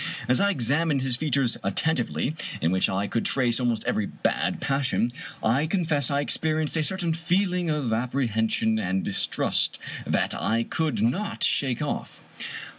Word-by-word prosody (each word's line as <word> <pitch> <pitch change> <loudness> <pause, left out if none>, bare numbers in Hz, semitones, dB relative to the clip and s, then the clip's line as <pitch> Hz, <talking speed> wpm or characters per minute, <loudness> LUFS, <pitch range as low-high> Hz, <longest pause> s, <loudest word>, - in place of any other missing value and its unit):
As 125 +1 +3
I 200 - +3
examined 145 - +1
his 130 -2 +2
features 140 -3 0
attentively, 130 +6 0 0.2
in 80 - +1
which 95 0 +2
I 95 +2 -1
could 115 +2 -1
trace 125 -3 +1
almost 120 -3 0
every 105 - 0
bad - - -1
passion, 135 -3 0 0.3
I 130 +8 +2
confess 160 -7 +1
I 140 0 +1
experienced 155 +1 0
a 160 - +1
certain 175 -1 +1
feeling 180 +1 0
of 145 -7 0
apprehension 110 -2 0
and 95 -1 -1
distrust - - 0 0.3
that - - +1
I 115 +2 0
could 140 -6 -1
not 190 - 0
shake 130 0 +2
off. 145 - -4
135 Hz, 150 wpm, -26 LUFS, 115-160 Hz, 0.3 s, As